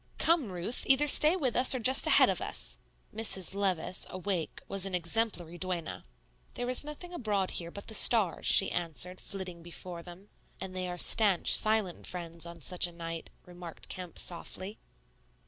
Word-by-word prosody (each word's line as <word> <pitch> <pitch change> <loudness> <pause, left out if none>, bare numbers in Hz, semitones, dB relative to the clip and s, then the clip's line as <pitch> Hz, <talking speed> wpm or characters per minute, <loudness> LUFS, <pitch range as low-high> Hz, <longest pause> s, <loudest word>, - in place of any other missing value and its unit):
"Come, 320 - +1
Ruth, 180 +7 -2
either 270 +2 +4
stay 305 +3 +7
with 270 -9 -2
us 255 +1 +5
or - - -2
just 260 +3 +6
ahead - - +5
of - - -2
us." - - -3 0.3
Mrs. 210 -4 -1
Levice, 185 -3 0
awake, 185 -3 -5
was 195 -1 -2
an 190 - -3
exemplary 175 -1 -2
duenna. 180 -3 -4 0.5
"There 245 +1 -3
is 255 - +4
nothing 300 +4 -9
abroad 210 - -2
here 170 -1 -3
but 200 +3 -10
the 220 - -5
stars," 215 -6 +2
she - - +7
answered, 175 +2 -4
flitting 185 -4 -7
before 175 +1 -9
them. 180 +4 -14 0.3
"And 185 -1 -8
they 185 0 -4
are 180 0 -6
stanch, 200 -2 +2
silent 215 -5 -1
friends 170 -1 -6
on 170 -1 -12
such 180 +4 0
a - - -12
night," 165 -1 -8 0.2
remarked 175 -2 -11
Kemp, 180 -2 -8
softly. 185 +3 -4
185 Hz, 170 wpm, -29 LUFS, 175-220 Hz, 0.5 s, stay